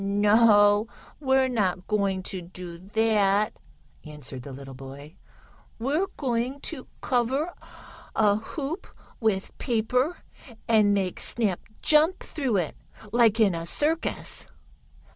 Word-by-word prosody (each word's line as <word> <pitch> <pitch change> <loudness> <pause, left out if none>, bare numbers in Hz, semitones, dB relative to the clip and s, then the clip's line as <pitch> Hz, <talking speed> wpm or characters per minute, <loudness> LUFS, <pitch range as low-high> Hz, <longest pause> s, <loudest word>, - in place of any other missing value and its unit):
"No, 205 +1 +5 0.3
we're 265 -2 +3
not 190 -7 0
going 200 -3 0
to 185 -1 -5
do 175 -1 -9
that," 210 +1 +2 0.5
answered 145 -4 -8
the 140 - -9
little 135 0 -9
boy. 135 +3 -10 0.6
"We're 290 +11 0
going 255 0 -1
to - - -6
cover 265 +7 0 0.6
a 210 -2 +4
hoop 285 - -5 0.3
with 210 -4 0
paper, 250 +6 0 0.5
and 210 -3 +4
make 190 -2 -1
Snap 210 -7 +1 0.2
jump 310 +4 +4
through 265 -9 -1
it, 170 -5 -1 0.4
like 230 -1 +4
in 205 -4 +5
a 165 0 -4
circus." 315 - -2
215 Hz, 115 wpm, -26 LUFS, 185-250 Hz, 0.6 s, No